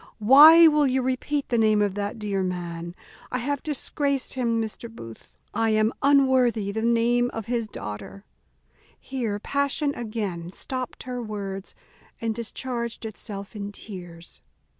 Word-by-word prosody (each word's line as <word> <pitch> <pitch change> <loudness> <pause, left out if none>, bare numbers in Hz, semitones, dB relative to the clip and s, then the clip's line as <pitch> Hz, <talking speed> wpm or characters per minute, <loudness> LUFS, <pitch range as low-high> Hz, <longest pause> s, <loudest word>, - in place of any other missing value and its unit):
why 300 +9 +9
will 300 -2 +4
you 260 0 +1
repeat 265 +3 -1
the 240 -2 +2
name 215 -1 +4
of 205 -2 +1
that 205 +2 -3
dear 205 -3 -2
man? 175 -2 -4 0.4
I 250 - 0
have 280 +3 -2
disgraced 285 -2 -2
him, 235 -3 0
Mr. 225 +1 -4
Booth, 115 - -12 0.2
I 225 0 +1
am 215 +1 +2
unworthy 260 -7 +3
the 220 +2 -3
name 235 +1 +2
of 225 -2 -4
his 235 -1 -1
daughter." 195 - -8 0.7
Here 235 -6 -3
passion 280 +5 0
again 205 -8 -4
stopped 255 +2 -5
her 250 -1 -4
words, 200 -3 -6 0.4
and 225 -1 -1
discharged 235 0 -4
itself 210 -1 -7
in 205 -1 -5
tears. 175 - -10
225 Hz, 140 wpm, -25 LUFS, 200-255 Hz, 0.7 s, why